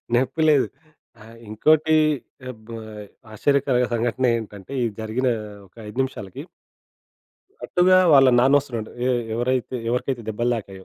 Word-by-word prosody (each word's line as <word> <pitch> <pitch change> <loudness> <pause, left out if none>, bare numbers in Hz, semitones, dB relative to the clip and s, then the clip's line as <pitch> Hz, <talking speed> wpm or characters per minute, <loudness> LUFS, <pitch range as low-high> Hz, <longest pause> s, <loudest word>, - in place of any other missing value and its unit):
నొప్పి 130 +5 0
లేదు. 145 -3 +3 0.6
ఆహ్, 115 +1 -14
ఇంకోటి 155 +8 +3 0.5
అబ్ 110 -1 -14 0.6
ఆశ్చర్యకరమైన 130 +1 +1
సంఘటనేంటంటే, 115 -2 -2
ఇది 115 - -2
జరిగిన 115 +4 -1 0.4
ఒక 90 - -30
5 110 - -9
నిమిషాలకి 105 -8 -7 1.2
అటుగా 185 +1 +3 0.2
వాళ్ళ 135 -2 +7
నాన్న 135 +3 +5
ఒస్తునాడు, 120 -6 -7 0.2
ఎ - - +2 0.3
ఎవరైతే 125 +2 -1
ఎవరికైతే 125 0 -2
దెబ్బలు 120 +3 -1
తాకాయో. 95 -3 -9
125 Hz, 115 wpm, -22 LUFS, 110-135 Hz, 1.2 s, వాళ్ళ